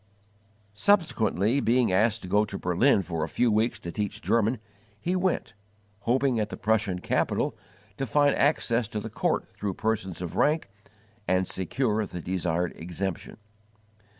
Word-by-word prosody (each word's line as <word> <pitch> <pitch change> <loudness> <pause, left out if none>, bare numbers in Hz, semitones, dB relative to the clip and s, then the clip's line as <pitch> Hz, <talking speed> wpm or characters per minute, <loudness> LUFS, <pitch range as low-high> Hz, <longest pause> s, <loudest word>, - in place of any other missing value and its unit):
Subsequently 120 - +2
being 125 -3 +2
asked 110 +4 +2
to - - -6
go 105 +3 +3
to 100 -2 -4
Berlin 95 +5 +3
for 85 -2 -3
a 75 - -3
few 120 +6 +2
weeks 110 +2 +1
to 85 -6 -7
teach 105 +2 -3
German, 115 +2 +1 0.4
he 180 - -1
went, 180 -10 0 0.5
hoping 125 +2 +1
at 105 -1 -1
the - - -6
Prussian 105 -3 +1
capital 90 - 0 0.4
to 135 - -2
find 145 +4 +3
access 125 -6 +2
to 105 - -4
the 110 +1 -7
court - - 0
through 100 -3 -2
persons 110 -5 -2
of 90 -2 -5
rank 150 -8 +2 0.6
and 95 +1 +2
secure 110 +3 0
the 90 - -6
desired 90 -1 -1
exemption. 90 +2 -5
105 Hz, 150 wpm, -27 LUFS, 95-120 Hz, 0.6 s, go